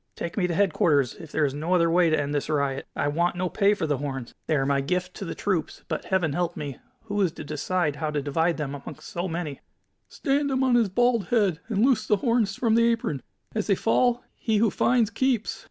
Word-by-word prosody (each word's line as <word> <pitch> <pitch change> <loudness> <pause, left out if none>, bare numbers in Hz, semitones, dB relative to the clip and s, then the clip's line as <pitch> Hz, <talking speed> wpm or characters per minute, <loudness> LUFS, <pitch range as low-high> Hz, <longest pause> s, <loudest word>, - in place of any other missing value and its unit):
Take 170 - -5
me 185 -4 +1
to 170 - -2
headquarters, 155 -8 +2
if 160 -3 -12
there 155 - +2
is 135 - -1
no 160 +5 0
other 170 -2 +4
way 175 0 +4
to 155 - +2
end 145 0 -2
this 145 +1 -2
riot. 140 -3 -1
I - - 0
want 170 +4 +1
no 180 0 -1
pay 205 +2 +3
for 165 - -2
the 145 -4 0
horns. 135 -4 -5
They 155 - +2
are 135 -2 +1
my 140 0 +2
gift 180 +5 -2
to 195 - -5
the - - -5
troops, 185 -6 -2
but, - - -3
Heaven 180 -6 +1
help 175 +1 -1
me! 140 -3 -5 0.2
who 205 -2 -2
is 185 -4 +2
to - - -8
decide 150 +1 -1
how 155 +2 -2
to 150 -1 -1
divide 160 +4 +1
them 145 -3 -3
amongst 145 +1 -9
so 175 +2 -3
many?" 165 -4 -4 0.5
"Stand 285 0 0
him 265 -1 +1
on 260 -2 +3
his 235 -4 +4
bald 240 +1 +2
head, 205 -9 +2
and 215 +1 +2
loose 230 -5 +2
the 210 - +3
horns 225 -2 +1
from 230 -2 +1
the 230 +1 +4
apron. 160 - -2 0.3
As 215 -2 -2
they 200 - +4
fall, 245 +4 +2
he 220 -2 0
who 215 -1 +3
finds 235 -3 +2
keeps!" 230 -4 0
180 Hz, 240 wpm, -26 LUFS, 150-220 Hz, 0.5 s, other